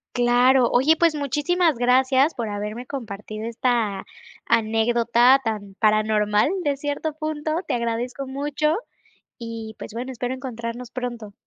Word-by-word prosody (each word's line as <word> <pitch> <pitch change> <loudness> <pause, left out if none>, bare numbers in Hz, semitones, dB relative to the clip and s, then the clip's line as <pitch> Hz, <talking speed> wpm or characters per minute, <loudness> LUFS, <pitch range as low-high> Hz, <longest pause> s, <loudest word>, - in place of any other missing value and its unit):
Claro. 245 +1 +4
Oye, 285 +6 +4
pues 335 -2 +3
muchísimas 300 +3 +1
gracias 260 +4 +3
por 230 -4 -4
haberme 210 +4 -5
compartido 215 -4 -6
esta 230 -4 -1 0.4
anécdota 235 +3 +3
tan 205 -3 -4
paranormal 215 +1 +2
de 285 -3 0
cierto 290 +2 -3
punto. 310 0 -3 0.2
Te - - 0
agradezco 240 +3 -3
mucho, 290 +3 -1 0.6
y 230 -2 -7
pues 210 - -8
bueno, 250 +3 -5
espero 250 +1 -3
encontrarnos 240 -1 -6
pronto. 240 -5 -5
245 Hz, 125 wpm, -23 LUFS, 225-275 Hz, 0.6 s, Claro